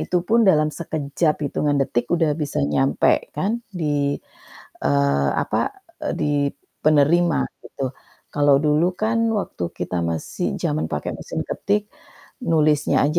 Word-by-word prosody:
itupun 185 +6 +1
dalam 155 -7 +4
sekejap, 155 -1 -1
hitungan 145 +1 0
detik 120 -2 0
udah 165 -3 +2
bisa 150 -3 -3
nyampai 70 0 +2
kan 225 +5 0
di 145 -5 0 0.7
eee, 70 -1 +2
apa, - - -1 0.5
eee, - - -1
di 150 - +1 0.5
penerima 155 +3 +4 0.3
gitu. 135 -1 -4 0.4
Kalau 145 -1 +5
dulu 150 +3 +3 0.2
kan 225 +1 +1 0.2
waktu 90 - -5 0.2
kita 90 0 -2
masih 80 -2 -3 0.2
zaman 75 +2 0
pakai 75 - -2
mesin - - -4
ketik, 210 +1 -1 0.5
nulisnya 155 - +2
aja 155 +4 +2
150 Hz, 125 wpm, -22 LUFS, 135-175 Hz, 0.7 s, Kalau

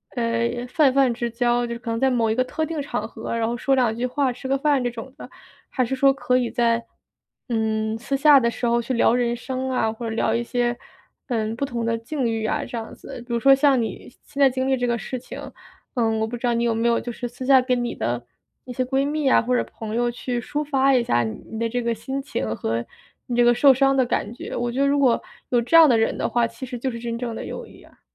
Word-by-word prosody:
呃， 235 0 -1
泛 270 0 +3
泛 270 -3 +3
之 235 0 -3
交， 240 +1 +1
就 235 - -4
是 235 - -7
可 235 - -7
能 230 - -1
在 265 - +3
某 230 -3 +1
一 220 - +1
个 255 - +2
特 315 +5 -3
定 315 -1 -3
场 245 -6 -3
合， 225 0 -6
然 225 - 0
后 235 - -2
说 270 +3 +1
两 240 -4 +2
句 240 +2 -2
话， 260 0 0
吃 255 - -14
个 275 - +2
饭 280 -2 +2
这 245 - -1
种 240 +3 -9
的， - - -10 0.4
还 255 - 0
是 265 - -2
说 275 +1 +5
可 255 -2 +1
以 245 -2 -1
在， 235 -1 +1 0.6
嗯， 220 -2 -1
私 275 +4 -2
下 290 0 +7
的 235 -2 +2
时 245 - -4
候 235 0 +2
去 235 +3 -3
聊 235 -1 +3
人 240 -1 +1
生 260 +1 -4
啊， 225 -4 0
或 230 0 -5
者 - - -3
聊 225 0 +1
一 235 - 0
些， 240 0 -1 0.5
嗯， 225 -3 -1
不 245 - -4
同 240 -3 -3
的 230 0 0
境 245 +3 -3
遇 225 -1 -2
啊 290 +5 -1
这 240 - -6
样 225 -1 -6
子。 240 - -10
比 240 - -5
如 235 - +1
说 270 +3 +6
像 270 -2 +3
你 225 - -5 0.2
现 285 -1 -5
在 275 - +7
经 260 +1 -2
历 265 - +3
这 245 -1 -1
个 240 -1 0
事 255 +3 -5
情， 245 - -9 0.5
呃， 235 -4 +1
我 220 - 0
不 235 - -5
知 240 - -4
道 240 - +2
你 235 0 0
有 230 -1 +1
没 230 +1 +1
有 235 - +2
就 - - -6
是 245 +1 -5
私 245 +2 -8
下 265 -1 +6
跟 250 -1 0
你 240 - -3
的 120 0 -2 0.4
一 250 - -7
些 255 - 0
闺 270 +2 0
蜜 300 -2 0
啊， - - +5
或 250 +2 0
者 - - +2
朋 220 -1 -7
友 240 0 +1
去 245 0 -3
抒 295 +5 -3
发 275 -1 +3
一 255 - +4
下 120 - +2
你 110 - -5
你 - - -4
的 230 0 0
这 245 +2 -1
个 235 -1 -1
心 265 +5 -4
情 110 - -3
和 115 +1 -2 0.4
你 245 - -2
这 240 - +5
个 240 0 +5
受 275 +2 +6
伤 270 +1 +3
的 260 -1 +3
感 225 -2 -2
觉， 240 - -8
我 240 0 -1
觉 265 - 0
得 280 - +4
如 285 0 +2
果 250 -4 +3 0.3
有 240 -1 +3
这 250 +8 +4
样 325 -2 +9
的 240 - +4
人 225 - +1
的 - - 0
话， 235 +1 +1
其 230 +3 -7
实 250 -1 -6
就 260 +2 -2
是 235 - -6
真 235 0 -4
正 235 -1 -4
的 225 - -6
友 - - -6
谊 - - -16
啊。 - - -22
240 Hz, 305 characters per minute, -23 LUFS, 230-265 Hz, 0.6 s, 样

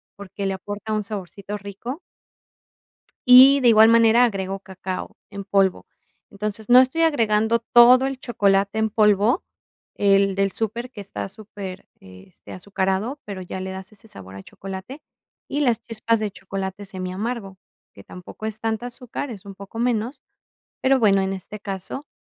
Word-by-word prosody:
porque 200 0 -7
le 195 - 0
aporta 205 +3 -6
un 215 - 0
saborcito 200 0 -6
rico. 205 - -7 1.3
Y 260 +3 +9
de 245 - +4
igual 220 0 +7
manera 230 +1 +5
agrego 195 -3 -3
cacao 190 -1 -7
en 200 -1 -7
polvo, 195 -2 +1 0.5
entonces, 210 +2 -5
no 245 - +8
estoy 260 +6 +2
agregando 225 -7 +2
todo 240 +3 +6
el 270 -1 -3
chocolate 200 -4 +1
en 220 0 0
polvo, 210 - +3 0.5
el 195 -1 +3
del 195 0 +1
super 230 +5 -4
que 210 - -9
está 200 - -6
súper, 195 -1 -9
este, 95 - -14
azucarado, 195 +7 -2
pero 200 -2 -6
ya 185 +1 -6
le 190 0 -5
das 190 +1 -8
ese 215 +2 -18
sabor 95 - -10
a 95 - -9
chocolate, 195 +9 -9 0.5
y 290 - -2
las 235 -4 +1
chispas 230 0 -1
de 215 - -2
chocolate 195 0 -6
semiamargo, 195 +2 -5 0.4
que 100 - -14
tampoco 180 - -10
es 220 0 -4
tanta 225 +1 -2
azúcar, 250 +1 -6
es 205 -2 -9
un 195 -1 -10
poco 200 +3 -9
menos, 245 +3 -1 0.6
pero 265 0 +3
bueno, 200 -3 +4
en 190 0 -1
este 195 +2 -8
caso, 200 +8 -6
205 Hz, 160 wpm, -22 LUFS, 195-230 Hz, 1.3 s, Y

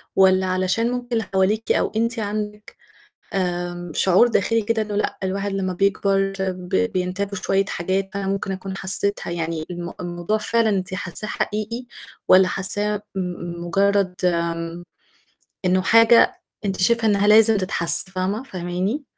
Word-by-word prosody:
والّا 190 0 +5
علشان 185 +6 0
ممكن 245 -1 -4
اللي 225 -1 +1
حواليكِ 200 +4 +1
أو - - +1
أنتِ 230 +1 0
عندك 210 0 -5 0.6
آآ 175 -2 -2
شعور 190 +6 +4
داخلي 225 0 +1
كده 220 +1 0
إنه 210 -1 -4
لأ، 210 - -1
الواحد 195 +1 -2
لمّا 190 -1 -2
بيكبر 195 +1 +1
ب 185 -1 -3 0.2
بينتابُه 185 +2 -2
شوية 195 +1 +1
حاجات، 190 +2 -2
فأنا 200 -1 -3
ممكن 195 0 -2
أكون 190 0 -5
حسيتها 195 -1 -2
يعني 165 -2 -3
الم 175 0 -6
الموضوع 175 +4 -2
فعلًا 225 +1 +1
أنتِ 185 -2 -1
حاساه 185 +3 -5
حقيقي، 220 +5 -3 0.4
والّا 185 0 +7
حاساه 205 +2 -2
م 175 -2 -4
مُجرد 195 0 +2
آمم 170 0 -1 0.8
إنه 185 +1 +3
حاجة 230 +3 +5 0.2
أنتِ 195 -1 -2
شايفة 230 +3 +3
إنها 205 0 +2
لازم 220 0 +6
تتحس 175 -1 +1
فاهمة، 190 +6 -2
فاهماني؟ 185 - -3
195 Hz, 145 wpm, -22 LUFS, 180-210 Hz, 0.8 s, والّا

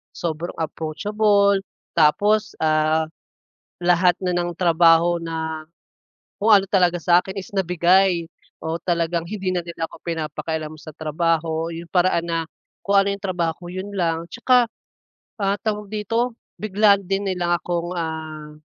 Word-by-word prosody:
sobrang 170 0 -4
approachable, 200 +6 +1 0.4
tapos, 205 +7 +3
ah, 155 0 +2 0.8
lahat 175 0 +4
na 180 - +1
ng 175 -1 -1
trabaho 170 0 +4
na 160 -1 -4 0.7
kung 210 - 0
ano 200 -2 +6
talaga 180 -3 +3
sa'kin 180 +3 +2
is 190 - -9
nabigay, 180 0 +3 0.4
oo, 160 +1 -2
talagang 170 -1 0
hindi 190 -1 -3
na 180 - 0
nila 170 -1 -6
ako - - -12
pinapakialam 160 -1 -4
sa 155 - -10
trabaho. 160 +1 -1
'Yung 165 +1 -8
paraan 175 -2 +2
na 165 0 0 0.5
kung 200 0 +3
ano 200 - -1
'yung 200 - -7
trabaho 175 -4 -1
ko 175 - -10
'yun 185 +2 -6
lang. 165 -2 -1
Tsaka, 245 +1 +3 0.8
ah, 195 0 +2
tawag 210 -2 -3
dito 225 +3 -1 0.2
bigla 210 0 +4
din 195 +1 -2
nilang 175 -2 0
akong, 175 0 -3
ah, 155 -2 -5
175 Hz, 140 wpm, -22 LUFS, 165-195 Hz, 0.8 s, ano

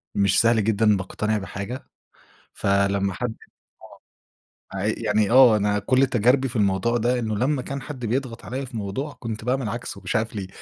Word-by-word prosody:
مش 100 -1 +3
سهل 115 -1 +3
جدًا 105 0 +3
باقتنع 105 +3 -2
بحاجة، 100 +5 -6 0.7
فلمّا 100 0 +1
حد 120 +2 -4 1.4
آه، - - -5
عي 100 +3 0
يعني 105 -2 0
آه 125 -3 +7
أنا 105 0 +1
كلّ 130 +6 +3
تجاربي 125 +3 +2
في 125 - -7
الموضوع 100 +2 +1
ده 120 +2 +1
إنه 110 -2 -2
لمّا 130 +5 0
كان 140 +2 -5
حد 130 -3 -7
بيضغط 120 +1 -3
عليَّ 130 +7 -4
في 125 -2 -8
موضوع 110 +9 -4
كنت 110 -2 -5
باعمل 125 -2 0
عكسه 115 -3 -6
مش 95 +5 -4
عارف 110 0 -1
ليه، 100 -3 -4
110 Hz, 175 wpm, -23 LUFS, 100-125 Hz, 1.4 s, آه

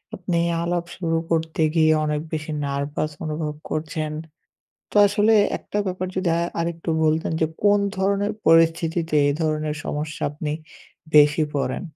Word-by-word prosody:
আপনি 175 -2 -2 0.2
আলাপ 170 0 -1
শুরু 165 -3 0
করতে 160 0 0
গিয়ে 160 -1 +5
অনেক 150 0 -1
বেশি 155 0 -3
নার্ভাস 140 +2 -2
অনুভব 150 -1 -3 0.2
করছেন। 155 0 -3 0.8
তো - - -6
আসলে 205 +2 +3 0.3
একটা 205 - -5
ব্যাপার 185 0 -2
যদি 185 -2 0
আ - - +1 0.2
আরেকটু 165 0 -3
বলতেন 160 +1 +1
যে 160 - +3 0.2
কোন 205 0 +5 0.2
ধরনের 200 +2 +1
পরিস্থিতিতে 165 0 +3
এই 145 - +2
ধরনের 155 -1 -1
সমস্যা 150 +1 -4
আপনি 150 0 -4 0.6
বেশি 150 +1 +6
পড়েন? 135 +2 -1
160 Hz, 140 wpm, -23 LUFS, 150-175 Hz, 0.8 s, বেশি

